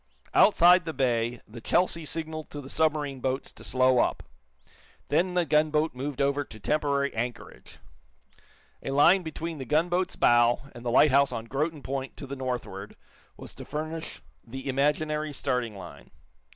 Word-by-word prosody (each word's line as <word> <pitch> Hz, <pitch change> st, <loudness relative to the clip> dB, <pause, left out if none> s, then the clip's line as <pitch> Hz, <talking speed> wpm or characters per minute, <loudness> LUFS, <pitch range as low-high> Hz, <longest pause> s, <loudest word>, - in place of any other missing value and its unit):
Outside 180 Hz, -3 st, +6 dB
the 160 Hz, -, -4 dB
bay 120 Hz, -2 st, 0 dB
the 115 Hz, +2 st, -11 dB
"Chelsea" 170 Hz, +3 st, +1 dB
signaled 155 Hz, -1 st, -5 dB
to 145 Hz, -, -7 dB
the 135 Hz, -1 st, -9 dB
submarine 150 Hz, -4 st, 0 dB
boats 130 Hz, +1 st, -2 dB
to -, -, -14 dB
slow 130 Hz, -1 st, +3 dB
up. -, -, 0 dB, 0.9 s
Then 180 Hz, +5 st, +1 dB
the 175 Hz, -1 st, +2 dB
gunboat 155 Hz, 0 st, +2 dB
moved 135 Hz, +2 st, -5 dB
over 140 Hz, +1 st, +1 dB
to 110 Hz, -5 st, -13 dB
temporary 140 Hz, +3 st, 0 dB
anchorage. 120 Hz, +2 st, -6 dB, 1.0 s
A -, -, -5 dB
line 145 Hz, +8 st, +5 dB
between 160 Hz, -1 st, -6 dB
the -, -, -4 dB
gunboat's 175 Hz, +6 st, 0 dB
bow 120 Hz, 0 st, +4 dB
and 120 Hz, -, -11 dB
the 120 Hz, -, -2 dB
lighthouse 140 Hz, +2 st, +5 dB
on 115 Hz, -2 st, -5 dB
Groton 145 Hz, +4 st, -3 dB
Point, 135 Hz, 0 st, -5 dB
to -, -, -7 dB
the 140 Hz, +1 st, -6 dB
northward, 125 Hz, -7 st, -5 dB, 0.4 s
was -, -, -10 dB
to -, -, -9 dB
furnish 155 Hz, +2 st, -6 dB, 0.2 s
the 130 Hz, +4 st, -8 dB
imaginary 150 Hz, +3 st, 0 dB
starting 125 Hz, -6 st, -2 dB
line. 90 Hz, -7 st, -11 dB
140 Hz, 155 wpm, -27 LUFS, 125-155 Hz, 1.0 s, Outside